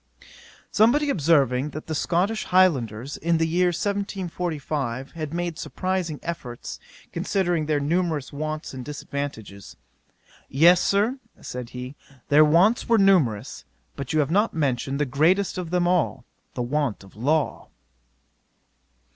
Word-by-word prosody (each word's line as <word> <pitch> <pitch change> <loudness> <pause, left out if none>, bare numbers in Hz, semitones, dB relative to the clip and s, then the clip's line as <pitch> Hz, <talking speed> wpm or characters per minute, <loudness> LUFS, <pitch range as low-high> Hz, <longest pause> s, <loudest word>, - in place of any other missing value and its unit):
'Somebody 280 +7 +3
observing 140 - +2
that 155 +1 -8
the 160 - -4
Scotch 180 +8 0
Highlanders, 135 - +2
in 170 +1 +1
the 165 - +2
year 180 +3 +2
1745, 170 - -3
had 155 -3 -5
made 175 -1 -3
surprising 185 -5 -3
efforts, 125 -8 -6 0.3
considering 175 -5 0
their 150 -2 +1
numerous 155 -1 -1
wants 155 +1 -4
and 130 -1 -6
disadvantages: 140 -8 -6 0.7
"Yes, 170 +6 +5
Sir, 215 +7 +1 0.2
(said 125 -1 -7
he,) 125 +2 -7 0.4
their 150 +2 +7
wants 180 +12 +3
were 230 - +5
numerous; 150 - +2 0.3
but 140 -3 -5
you 155 -1 +3
have 145 +1 -2
not 205 +3 +2
mentioned 140 -2 -1
the 150 - +2
greatest 170 +10 +2
of 175 -3 -5
them 175 0 +1
all, 165 -8 0 0.3
the 125 - -1
want 135 -4 -1
of 95 - -17
law." 145 +7 -1
155 Hz, 130 wpm, -24 LUFS, 135-180 Hz, 0.7 s, their